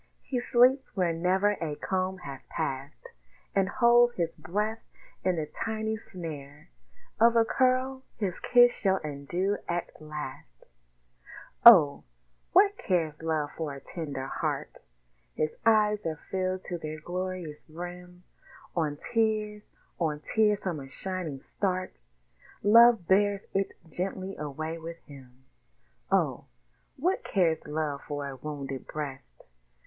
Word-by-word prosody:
He 255 Hz, -, -2 dB
sleeps 250 Hz, +2 st, +3 dB
where 175 Hz, -3 st, +2 dB
never 185 Hz, +5 st, +2 dB
a 155 Hz, -3 st, -2 dB
comb 185 Hz, +3 st, -2 dB
has 135 Hz, -1 st, -7 dB
passed, 135 Hz, +2 st, -4 dB, 0.4 s
And 195 Hz, -1 st, +2 dB
holds 240 Hz, +1 st, +5 dB
his 170 Hz, -5 st, -1 dB
breath 210 Hz, +8 st, -2 dB, 0.4 s
in 185 Hz, -1 st, +2 dB
the 160 Hz, -2 st, -2 dB
tiny 220 Hz, +6 st, -3 dB
snare 150 Hz, -, -9 dB, 0.5 s
Of 230 Hz, +1 st, +6 dB
a 230 Hz, -1 st, +5 dB
curl 260 Hz, +2 st, +1 dB, 0.2 s
his 195 Hz, -5 st, -2 dB
kiss 245 Hz, -1 st, +6 dB
shall 190 Hz, -2 st, +1 dB
undo 155 Hz, +7 st, -2 dB
at 175 Hz, -2 st, -3 dB
last 135 Hz, -, -8 dB, 1.0 s
Oh! 165 Hz, -12 st, +9 dB, 0.5 s
what 400 Hz, +2 st, +5 dB
cares 160 Hz, -5 st, 0 dB
Love 155 Hz, -2 st, -1 dB
for 155 Hz, -4 st, -4 dB
a -, -, -8 dB
tender 140 Hz, -3 st, -5 dB
heart? -, -, -3 dB, 0.6 s
His 155 Hz, 0 st, -1 dB
eyes 210 Hz, -1 st, +4 dB
are 160 Hz, -1 st, -3 dB
filled 185 Hz, 0 st, -1 dB
to 175 Hz, -2 st, -5 dB
their 155 Hz, 0 st, -6 dB
glorious 180 Hz, -2 st, -5 dB
brim; 180 Hz, +2 st, -9 dB, 0.5 s
On 155 Hz, -4 st, 0 dB
tears, 215 Hz, 0 st, -1 dB, 0.3 s
on 155 Hz, -3 st, 0 dB
tears 210 Hz, +3 st, +2 dB
from 175 Hz, -5 st, -2 dB
a 135 Hz, -1 st, -9 dB
shining 175 Hz, -4 st, -5 dB
start 185 Hz, -, -3 dB, 0.6 s
Love 230 Hz, -2 st, +7 dB
bears 200 Hz, +1 st, +3 dB
it 195 Hz, 0 st, 0 dB
gently 190 Hz, +3 st, -4 dB
away 155 Hz, +3 st, -4 dB
with 165 Hz, +1 st, -7 dB
him. 130 Hz, -3 st, -15 dB, 0.7 s
Oh! -, -, +1 dB, 0.5 s
what 355 Hz, +8 st, 0 dB
cares 170 Hz, -6 st, +1 dB
Love 150 Hz, -2 st, -2 dB
for 145 Hz, -1 st, -3 dB
a 135 Hz, -, -6 dB
wounded 135 Hz, -1 st, -6 dB
breast? 135 Hz, -, -7 dB
180 Hz, 130 wpm, -28 LUFS, 150-210 Hz, 1.0 s, Oh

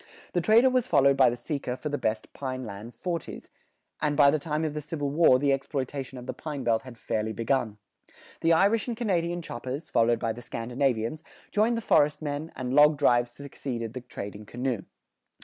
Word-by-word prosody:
The 175 Hz, -, +2 dB
trader 230 Hz, +8 st, +5 dB
was 255 Hz, -1 st, +1 dB
followed 140 Hz, -, +4 dB
by 135 Hz, -2 st, +6 dB
the 120 Hz, -, -2 dB
seeker 125 Hz, 0 st, -4 dB
for 150 Hz, -, -4 dB
the 145 Hz, -, -1 dB
best 110 Hz, 0 st, -2 dB
pine 130 Hz, -2 st, -4 dB
land 110 Hz, +3 st, -8 dB
"forties"; 170 Hz, +4 st, -5 dB, 0.5 s
and 150 Hz, -1 st, 0 dB
by 140 Hz, -2 st, +7 dB
the 155 Hz, -, +1 dB
time 155 Hz, +2 st, -2 dB
of 155 Hz, -, -2 dB
the 150 Hz, -, -3 dB
Civil 145 Hz, -1 st, -3 dB
War 150 Hz, -4 st, +5 dB
the 140 Hz, +1 st, +2 dB
exploitation 135 Hz, -1 st, -3 dB
of 125 Hz, -, -8 dB
the -, -, -4 dB
pine 150 Hz, -4 st, -5 dB
belt 115 Hz, -2 st, +2 dB
had 130 Hz, -3 st, -11 dB
fairly 110 Hz, 0 st, -2 dB
begun. 115 Hz, -2 st, -1 dB, 0.6 s
The 165 Hz, -, +2 dB
Irish 200 Hz, +8 st, +3 dB
and 235 Hz, -2 st, -3 dB
Canadian 175 Hz, -6 st, -1 dB
choppers, 130 Hz, +4 st, -6 dB
followed 115 Hz, 0 st, +3 dB
by 115 Hz, -, -1 dB
the 120 Hz, -, -9 dB
Scandinavians, 120 Hz, +4 st, -2 dB, 0.3 s
joined 225 Hz, +3 st, +2 dB
the -, -, -2 dB
forest 150 Hz, -8 st, +3 dB
men, 150 Hz, +1 st, -4 dB
and 125 Hz, 0 st, -3 dB
log 150 Hz, +1 st, +6 dB
drives 120 Hz, -4 st, +3 dB
succeeded 120 Hz, -3 st, -6 dB
the 125 Hz, -, -6 dB
trading 105 Hz, -3 st, -8 dB
canoe. 120 Hz, -4 st, -3 dB
135 Hz, 195 wpm, -27 LUFS, 120-155 Hz, 0.6 s, by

